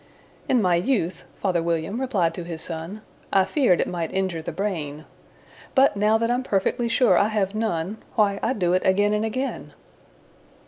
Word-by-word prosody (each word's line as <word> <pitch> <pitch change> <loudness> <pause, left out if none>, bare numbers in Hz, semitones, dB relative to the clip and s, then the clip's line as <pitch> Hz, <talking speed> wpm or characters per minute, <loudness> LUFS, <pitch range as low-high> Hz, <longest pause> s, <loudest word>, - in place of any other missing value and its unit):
"In 245 -4 +3
my 180 -2 +3
youth," 180 -3 -1
father 180 -4 0
William 170 +7 -2
replied 190 -11 +1
to 175 - -6
his 170 -1 -5
son, 170 +6 -6 0.3
"I 195 -1 +4
feared 195 - +2
it - - +1
might 170 -2 -3
injure 190 -4 -1
the - - -5
brain; 155 -7 -4 0.7
But, 270 -3 +5
now 210 +2 +3
that 230 +1 0
I'm 245 +1 +1
perfectly 235 +1 0
sure 240 +2 +4
I 200 - +3
have 210 -3 -1
none, 210 -3 -2 0.2
Why, 200 -2 +2
I 240 - +1
do 180 -6 0
it 185 - +2
again 205 +2 +3
and 210 +1 0
again." 255 +5 -3
195 Hz, 180 wpm, -24 LUFS, 170-220 Hz, 0.7 s, But